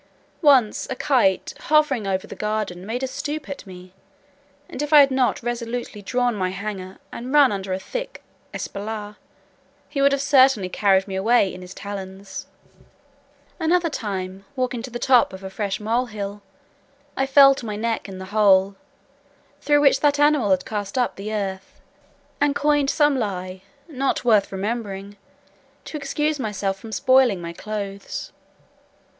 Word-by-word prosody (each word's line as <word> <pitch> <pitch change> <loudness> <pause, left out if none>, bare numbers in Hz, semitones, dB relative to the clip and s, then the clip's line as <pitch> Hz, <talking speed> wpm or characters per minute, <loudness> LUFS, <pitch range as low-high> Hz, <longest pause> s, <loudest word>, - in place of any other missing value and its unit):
Once 265 -9 +4
a - - -2
kite, 235 -9 +1
hovering 295 -8 +2
over 190 -1 -1
the - - -9
garden, 210 -4 -3
made 245 +4 -3
a - - 0
stoop 295 +3 -5
at 280 -7 -8
me, 180 0 -12 0.7
and - - -6
if 295 0 -3
I 300 - +9
had 280 -1 +6
not 260 -2 +1
resolutely 240 -2 -4
drawn 245 +4 0
my 185 -3 -1
hanger, 190 -1 -6
and 245 +2 -6
run 290 -4 +6
under 195 -1 -4
a 185 - 0
thick - - -6 0.3
espalier, 210 0 -6 0.7
he 280 - -3
would 280 0 +5
have 280 - +1
certainly 265 -9 +4
carried 195 0 +2
me 190 - -5
away 200 0 +3
in 185 - -9
his 180 +1 -10
talons. 195 -1 -7 1.1
Another 335 0 +2
time, 195 -5 -4
walking 255 -2 -2
to 255 - -7
the 240 - -5
top 245 -4 +3
of 190 +1 -9
a 190 - -6
fresh 195 -1 -3
mole 230 +4 0
hill, 205 -2 -6 0.7
I 270 - 0
fell 275 0 +7
to 265 - -8
my 210 - -3
neck 225 -1 -2
in 190 - -8
the 190 - -7
hole, 200 -2 +4 0.9
through 290 -1 +3
which 280 -2 +5
that 290 -1 +3
animal 290 -7 +3
had 185 -1 +2
cast 205 +1 -4
up 250 - +1
the 205 +2 -6
earth, 195 -3 -4 0.6
and 290 -1 +2
coined 290 -1 +2
some 295 -3 +3
lie, 185 -3 -4 0.3
not 275 -5 -1
worth 215 -4 +3
remembering, 200 -1 -4 0.7
to - - -8
excuse 295 +1 -1
myself 195 -4 -2
for 220 +2 -10
spoiling 255 -2 +3
my 170 0 -6
clothes. 200 0 -6
215 Hz, 160 wpm, -23 LUFS, 195-270 Hz, 1.1 s, I